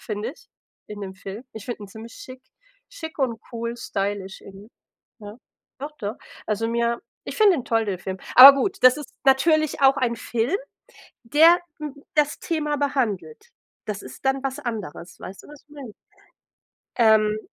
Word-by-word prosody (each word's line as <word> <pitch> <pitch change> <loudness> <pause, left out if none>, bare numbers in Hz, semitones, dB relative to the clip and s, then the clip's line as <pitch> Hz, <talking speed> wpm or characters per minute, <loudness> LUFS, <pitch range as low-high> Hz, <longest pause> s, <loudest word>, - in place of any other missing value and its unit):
finde 215 +1 -4
ich, - - -22 0.4
in 210 -1 -8
dem 190 -1 -7
Film. 195 +4 -8
Ich 220 -2 -8
finde 240 -3 -6
ihn - - -13
ziemlich 220 +3 -11
schick, 255 0 -11 0.5
schick 320 -12 -9
und 245 -5 -1
cool 235 0 -4
stylisch 200 -5 -4
irgendwie, 200 +3 -13 0.5
ja. 205 0 -9 0.5
Doch, 290 - -5
doch. 210 -2 -4 0.3
Also, 215 +1 -1
mir 235 0 0 0.2
ich - - -7
finde 425 -4 +5
ihn 255 - -5
toll, 225 -3 +1
den 195 -4 -3
Film. 190 0 -5 0.2
Aber 270 +2 +13
gut, 380 - -1
das 255 +1 +7
ist 295 - -9
natürlich 310 +3 +3
auch 270 0 +5
ein 240 -3 0
Film, 240 - -1 0.7
der 320 +8 +6 0.6
das 295 -1 +1
Thema 300 -3 -2
behandelt. 220 - -2 0.3
Das 210 -2 -4
ist 130 - -12
dann 270 0 +1
was 270 +1 -3
anderes, 200 - -6
weißt 195 - -10
du, - - -15
was 295 -1 -13
ich - - -48
meine? 280 -7 -10 1.0
Ähm. 215 -2 +4
235 Hz, 170 wpm, -23 LUFS, 210-280 Hz, 1.0 s, Aber